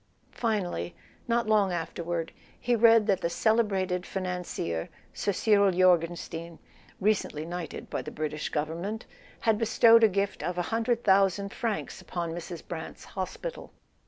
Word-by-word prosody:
Finally, 180 - -2 0.3
not 235 0 +2
long 215 -3 +3
after¬ 170 -1 -3
ward, 165 -1 -2 0.3
he 245 0 +1
read 225 -1 +6
that 195 -3 +1
the 170 - 0
celebrated 195 -3 +1
financier, 180 - -3 0.2
Sir 205 - -1
Cyril 200 0 +4
Jorgenstein 170 -2 +1 0.4
(recently 195 -7 0
knighted 175 0 -6
by - - -3
the - - -7
British 155 0 -4
Govern¬ 155 +2 -2
ment) 210 +5 -4 0.4
had 220 -2 +2
bestowed 230 0 +6
a - - +9
gift 200 0 -1
of 180 0 -3
a - - +2
hundred 230 +1 +1
thousand 195 0 +3
francs 225 -4 -3
upon 170 -2 -4
Mrs. 170 0 -7
Brant's 160 -2 -7
hospital. 195 - -6
185 Hz, 145 wpm, -28 LUFS, 170-215 Hz, 0.4 s, a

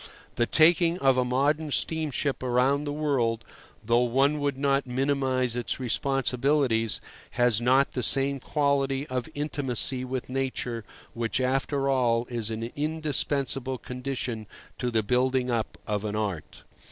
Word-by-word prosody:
The 120 - 0
taking 170 +1 +4
of 135 -5 +3
a 130 - +2
modern 145 +5 +1
steamship 145 -2 0
about 130 +3 +1
the 145 - -2
world 135 -7 0 0.4
(though 120 +2 +3
one 135 +5 +2
would 140 -2 -1
not 140 -1 +1
minimize 130 -1 0
its 120 +2 -2
responsibilities) 130 -2 +1 0.4
has 120 -2 +3
not 130 +3 +3
the 125 - -3
same 135 +3 +2
quality 140 -1 0
of 130 +2 -3
intimacy 135 -3 -1
with 130 0 -4
nature, 130 -3 -3 0.3
which, 115 0 -1
after 135 +2 0
all, 120 -3 +2
is 115 -2 -2
an 115 +1 -4
indispensable 145 -3 -1
condition 125 -4 -5 0.3
to 125 - -1
the 110 -2 +1
building 125 +2 +1
up 115 -2 -2
of 105 -1 -2
an 105 -1 -3
art. 100 -7 -4
130 Hz, 140 wpm, -27 LUFS, 120-140 Hz, 0.4 s, taking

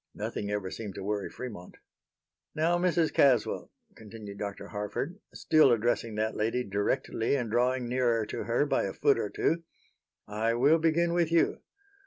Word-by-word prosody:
Nothing 100 - -4
ever 105 -2 -3
seemed 105 -4 -6
to - - -6
worry 100 0 -2
Fremont. 105 -8 -9 0.8
"Now, 170 +3 +2
Mrs. 175 -3 +1
Caswell," 130 -4 +2 0.3
continued 105 -2 -10
Dr. 100 -1 -5
Harford, 105 - -4
still 155 -4 +4
addressing 115 -1 0
that 110 +1 -1
lady 115 +4 0
directly 110 +4 -1
and 120 -5 -2
drawing 125 +1 +1
nearer 120 -3 +1
to - - -5
her - - +1
by - - +1
a - - -4
foot - - +2
or - - -2
two, 165 +2 0 0.7
"I 110 +2 0
will 145 +7 +4
begin 165 +1 +2
with 170 -2 +1
you. 170 - +2
120 Hz, 160 wpm, -29 LUFS, 105-155 Hz, 0.8 s, still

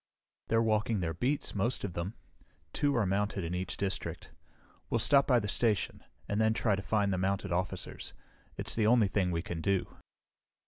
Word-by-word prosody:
"They're 115 0 +3
walking 110 -1 +1
their 80 -2 -1
beats, 130 - 0
most 110 +5 0
of 100 - -3
them. 85 +6 -4 0.6
Two 145 -1 +1
are 115 -4 +2
mounted 100 +1 0
in 85 +1 -3
each 90 0 -3
district. 100 -1 -3 0.6
We'll - - +2
stop 140 +4 +4
by 125 -3 +5
the 105 - -3
station, 105 -4 0 0.2
and 105 +2 0
then 110 0 +3
try 110 -3 +2
to 95 - -4
find 100 +1 +1
the 95 - -1
mounted 100 +1 -1
officers. 90 +2 -3 0.4
It's - - -1
the 110 -2 +2
only 115 -3 +5
thing 95 -2 +1
we 85 -1 -1
can 85 -3 -4
do." 95 +1 -1
100 Hz, 185 wpm, -31 LUFS, 95-115 Hz, 0.6 s, by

